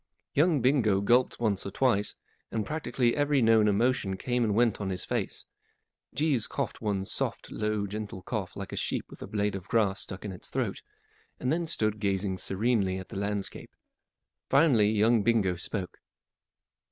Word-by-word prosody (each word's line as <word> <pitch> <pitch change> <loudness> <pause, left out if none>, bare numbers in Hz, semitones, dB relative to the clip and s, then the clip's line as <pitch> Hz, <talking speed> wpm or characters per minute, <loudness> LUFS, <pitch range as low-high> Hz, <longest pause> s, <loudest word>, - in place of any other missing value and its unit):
Young 150 -3 +3
Bingo 120 -7 +3
gulped 120 +5 +2
once 105 -5 +1
or - - -4
twice, 105 -2 +1 0.4
and 110 -2 -1
prac¬ 150 -5 -4
tically 120 -1 +2
every 145 -1 +2
known 110 -2 +5
emotion 105 -2 +1
came 125 +2 0
and 105 -3 +1
went 115 -2 +2
on 100 - -2
his 90 -1 -3
face. - - -3 0.7
Jeeves 140 -4 +1
coughed - - -4
one 100 -3 -1
soft, - - -2
low, 105 -1 -1
gentle 100 -2 -6
cough 100 -3 -4
like 100 -1 -6
a - - -2
sheep - - -2
with - - -12
a - - -6
blade 105 -1 -1
of 95 -1 -6
grass 105 -4 +1
stuck 95 +1 -7
in 100 - -4
its 90 - -9
throat, - - -2 0.6
and 130 +3 0
then 170 0 -1
stood 110 -8 0
gazing 95 -2 -1
serenely 100 -2 0
at 95 - -8
the 95 - -5
landscape. 100 -1 -3 0.7
Finally 135 -8 +5
young 110 +1 +3
Bingo 100 -5 +2
spoke. 90 +2 -4
105 Hz, 175 wpm, -29 LUFS, 100-120 Hz, 0.7 s, known